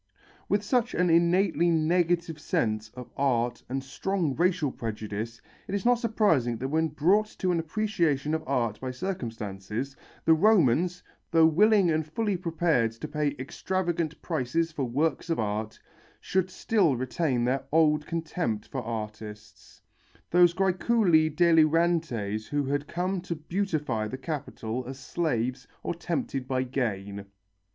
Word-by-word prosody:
With 205 0 +2
such 245 +2 0
an 180 -1 +2
innately 170 0 +3
negative 170 0 +1
sense 110 -10 -1
of 125 -1 -9
art 120 -3 0
and 135 +1 -2
strong 165 +1 -2
racial 175 -4 +1
prejudice, 110 0 -5 0.3
it 195 - -2
is 200 - -3
not 245 -1 +4
surprising 180 - +2
that 130 +3 -3
when 160 +2 +2
brought 180 +8 +2
to 185 - 0
an 170 - +1
appreciation 165 -5 0
of 160 - -1
art 120 -6 0
by 130 - -3
circumstances, 120 - -4 0.3
the 165 - +6
Romans, 180 - +3 0.3
though 165 -1 +5
willing 195 +2 +4
and 155 0 +1
fully 205 +5 -1
prepared 165 -9 +1
to 115 +7 -7
pay 150 -2 -1
extravagant 170 +4 -2
prices 165 +2 -1
for 145 -4 -2
works 150 +8 -1
of 165 - +1
art, 110 0 -3 0.4
should 185 -1 0
still 185 - +2
retain 130 +1 -1
their 130 +2 0
old 150 -1 +3
contempt 160 -9 -2
for 130 - -3
artists, 105 -2 -8 0.5
those 175 0 +5
græculi 185 -3 +3
delirantes 160 - +2
who 145 -1 -1
had 145 +2 -1
come 180 +2 -2
to 170 -1 -4
beautify 155 - -2
the 130 - -5
Capital 130 -5 -4
as 135 0 -6
slaves 130 -4 -2 0.2
or - - -2
tempted 160 -6 -3
by 130 -1 0
gain. 100 -6 -3
155 Hz, 140 wpm, -27 LUFS, 125-175 Hz, 0.5 s, the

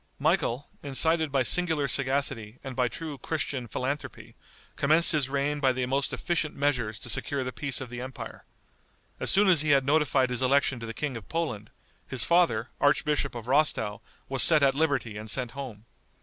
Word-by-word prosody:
Michael, 125 +5 0
incited 160 +2 +1
by 135 -1 +2
singular 160 -1 +2
sagacity 130 -5 0
and 135 -2 -7
by 125 -1 +2
true 150 +2 -6
Christian 140 -5 -3
philanthropy, 135 +6 -5 0.4
commenced 155 +4 +4
his 150 -5 +1
reign 140 +1 -1
by 135 -2 +3
the 125 0 -2
most 135 +2 -1
efficient 165 -3 -2
measures 125 -7 -1
to - - -6
secure 135 +4 -1
the 130 - -4
peace 140 -1 -4
of 130 -2 -8
the 120 0 -6
empire. 130 -1 -8 0.8
As - - -2
soon 205 +1 +4
as 175 -5 +5
he 155 - 0
had 135 - -2
notified 140 -3 +2
his 125 - -1
election 130 -1 +2
to 115 - -7
the 115 - -7
King 145 -4 -3
of 110 - -12
Poland, 120 -11 -3 0.4
his 130 -3 -1
father, 165 -9 +2
archbishop 145 -2 +1
of 120 -1 -7
Rostow, 135 -7 +1 0.3
was 135 -1 0
set 155 -3 +7
at 135 -1 +4
liberty 135 -7 -1
and 110 +1 -7
sent 125 +1 -1
home. 125 -6 -8
135 Hz, 185 wpm, -27 LUFS, 125-150 Hz, 0.8 s, set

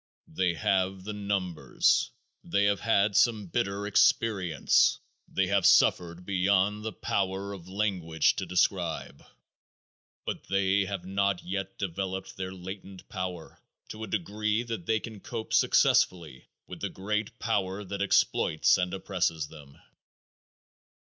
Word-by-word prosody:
They 90 +1 +1
have 95 +1 0
the 105 +2 -5
numbers. 100 -5 0 0.3
They 100 - +1
have 100 0 +2
had 100 -2 +2
some 110 -1 +3
bitter 100 +1 -2
experience. 100 -5 +3 0.3
They 95 - 0
have 100 0 +1
suffered 85 0 +3
beyond 100 +2 +1
the 110 - -3
power 95 +1 -2
of 90 -3 -10
language 95 -6 +1
to - - -3
describe, 90 -2 -1 1.0
but - - -4
they 95 0 +1
have 95 -2 -5
not 100 0 0
yet 95 +1 -4
developed 95 0 -4
their 95 0 -5
latent 95 0 -9
power 90 -3 -6 0.3
to 110 0 -7
a - - -5
degree 105 +3 -1
that 115 -8 -6
they 110 -1 +2
can 110 -2 -9
cope 115 +2 -6
successfully 80 -8 +2 0.2
with - - -9
the - - -2
great 105 +2 -3
power 100 -3 -1
that 100 +1 -5
exploits 95 -3 +3
and 90 0 -1
oppresses 85 -6 -1
them. 70 -3 -14
95 Hz, 130 wpm, -28 LUFS, 90-100 Hz, 1.0 s, some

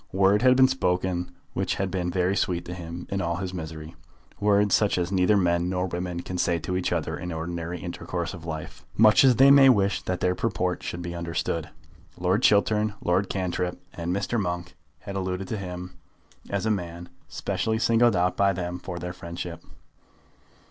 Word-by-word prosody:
Words 100 +3 +3
had 130 0 +6
been 130 0 +6
spoken 90 -7 -1 0.2
which - - -1
had 95 -1 -2
been 90 -1 -1
very 90 +2 +1
sweet 90 -3 -1
to 90 - -6
him 85 0 -7
in 95 0 -1
all 85 -1 -1
his 90 +1 -4
misery, 80 -2 -7 0.4
words 105 -1 +3
such 105 -3 +3
as 90 +1 -1
neither 95 +2 +3
men 85 -1 +1
nor 90 0 0
women 90 -1 -4
can 90 -1 -5
say 85 -1 +2
to 85 +3 -3
each 90 - -1
other - - -1
in 90 - -5
the 85 - -4
ordinary 85 +1 -4
intercourse 85 0 -4
of 85 -4 -9
life, 80 -2 -6
much 110 +2 +7
as 130 -2 +6
they 135 +4 +7
may 140 -1 +8
wish 100 -5 +3
that 90 -1 -3
their 90 - +2
purport 90 -3 -1
should 85 0 -5
be 85 0 -5
understood. 85 -1 -3 0.5
Lord 90 +5 +1
Chiltern, 105 -1 +3
Lord 95 +3 +1
Cantrip, 90 -1 -2
and 85 +1 -3
Mr. 100 +4 0
Monk 90 -1 -4 0.3
had 100 -1 -7
alluded 95 0 -3
to 110 - -2
him 90 -1 -6 0.6
as 100 +1 -1
a 110 - +2
man 85 -3 -4 0.2
specially 110 0 -2
singled 115 0 +3
out 90 0 +1
by 100 -1 +3
them 90 -1 -4
for 90 -1 -6
their 90 +1 -5
friendship. 85 -1 -7
90 Hz, 190 wpm, -26 LUFS, 85-100 Hz, 0.6 s, may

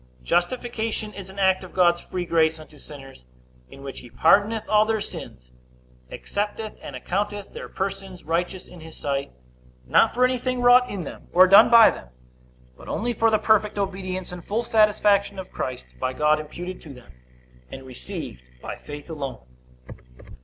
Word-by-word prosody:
A. - - -27
Justification 220 - -1
is 195 -1 -9
an 190 - -13
act 190 -1 +2
of 185 - -12
God's 175 -2 +3
free 180 -1 -5
grace 160 -1 +2
unto 155 -1 -14
sinners, 135 - -13 0.5
in 135 - -13
which 135 -1 -7
he 120 - -13
pardoneth 205 - +3
all 215 0 +4
their 220 0 0
sins, 60 - -9 0.6
accepteth 210 - -4
and 140 - -8
accounteth 200 +8 -3
their - - -8
persons 195 -1 -5
righteous 175 +3 -2
in 180 - -13
his 160 0 -12
sight; 140 -1 -3 0.5
not 220 - +4
for 250 +1 +3
anything 255 0 -1
wrought 245 +1 +6
in 195 -3 -4
them, - - -10
or 185 +1 +8
done 195 +4 +8
by 230 -1 +8
them, - - -10 0.7
but - - -13
only 240 +2 -1
for 225 0 +2
the 220 - +3
perfect 215 -1 +2
obedience 185 -2 -3
and 180 -1 -8
full 220 +4 -2
satisfaction 210 -3 +3
of 190 -1 -8
Christ, 130 -1 -5
by 130 0 -1
God 150 +3 +2
imputed 175 +4 -7
to 145 -4 -11
them, 125 - -16 0.6
and 135 0 -9
received 125 - -7 0.2
by - - -7
faith 145 0 -10
alone. 140 - -6
185 Hz, 170 wpm, -24 LUFS, 155-210 Hz, 0.7 s, or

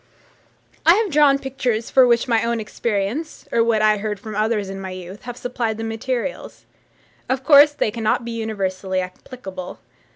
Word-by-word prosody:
I 335 +2 +7
have 425 -2 0
drawn 290 -2 +5
pictures 255 -4 -2
for 260 -2 +6
which 235 0 +2
my 230 -2 +2
own 235 0 0
experience, 220 +7 -3
or 230 - +3
what 225 -2 +2
I 215 0 +4
heard 210 0 -4
from 215 - -8
others 215 -1 0
in 195 0 -6
my 190 - -5
youth, 185 +3 -9
have 245 0 -7
supplied 235 -3 -3
the 225 - -5
materials. 235 +4 -4 0.6
Of 260 0 -1
course, 290 +1 +7
they 220 - 0
cannot 230 +1 -1
be 235 - -4
universally 195 -4 -2
applicable. 185 0 -8
225 Hz, 170 wpm, -21 LUFS, 205-255 Hz, 0.6 s, I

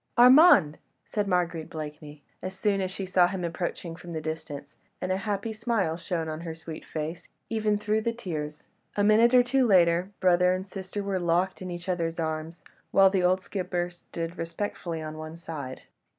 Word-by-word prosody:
"Armand!" 250 - +7 0.3
said 205 -1 -2
Marguerite 175 -3 0
Blakeney, 150 -1 -8 0.2
as 185 +1 -6
soon 200 -2 +1
as 185 - -1
she 190 +1 -5
saw 180 -1 +4
him 185 -1 -4
approaching 170 0 -3
from 175 0 -9
the 160 - -2
distance, 155 -2 -6 0.2
and 185 - -2
a 185 - +1
happy 205 +2 -2
smile 215 -7 0
shone 165 -1 -3
on 155 0 -4
her 165 -1 -5
sweet 160 -1 -8
face, 160 +2 -5 0.2
even 215 -2 +1
through 215 +1 0
the 230 +1 0
tears. 155 -10 -6 0.3
A 205 - +3
minute 225 +4 +5
or 250 - +7
two 255 +1 +2
later 175 -2 +4
brother 180 0 +4
and 185 +1 -4
sister 195 +1 -5
were 195 -1 -1
locked 175 +2 +1
in 185 - -5
each 175 +1 -6
other's 170 -2 -1
arms, 160 +1 -3 0.3
while 195 -1 +6
the 190 -2 +2
old 185 +1 +3
skipper 180 -2 -2
stood 170 -1 -7
respectfully 165 -1 -4
on 155 0 -6
one 155 +1 -7
side. 150 -6 -7
180 Hz, 185 wpm, -27 LUFS, 165-195 Hz, 0.3 s, Armand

